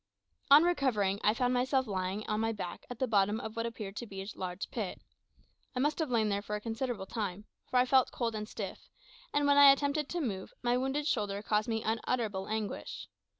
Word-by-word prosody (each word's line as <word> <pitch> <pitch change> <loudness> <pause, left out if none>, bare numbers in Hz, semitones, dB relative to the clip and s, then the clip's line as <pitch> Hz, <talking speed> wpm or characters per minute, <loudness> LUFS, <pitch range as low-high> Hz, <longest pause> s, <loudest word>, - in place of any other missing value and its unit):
On 290 +3 +9
recovering, 235 - +1
I 210 - +4
found 250 +1 +1
myself 260 +1 +2
lying 190 0 -2
on 215 0 0
my 225 0 +1
back 185 -5 -6
at 245 - -6
the 260 - +1
bottom 210 -2 +2
of 220 -1 -6
what 230 0 -1
appeared 210 -4 -6
to 240 - -5
be 195 -2 -8
a - - -10
large 185 +1 -5
pit. 210 -6 -4 0.8
I - - -1
must 295 +5 +1
have 315 -4 0
lain 225 -3 +2
there 200 0 0
for 210 +1 -4
a - - -2
considerable 225 -1 -3
time, 205 -2 -4 0.2
for 255 - +1
I 250 - +5
felt 260 0 +4
cold 235 -2 -2
and 215 0 -5
stiff; - - -7 0.4
and 290 0 +2
when 285 0 +4
I 285 -1 +10
attempted 285 +1 0
to 350 - -2
move, 200 - -4
my 240 0 +2
wounded 270 +3 -1
shoulder 205 -7 -1
caused 210 0 +1
me 225 -1 -1
unutterable 220 -3 -1
anguish. 215 -1 -4
225 Hz, 215 wpm, -32 LUFS, 205-260 Hz, 0.8 s, I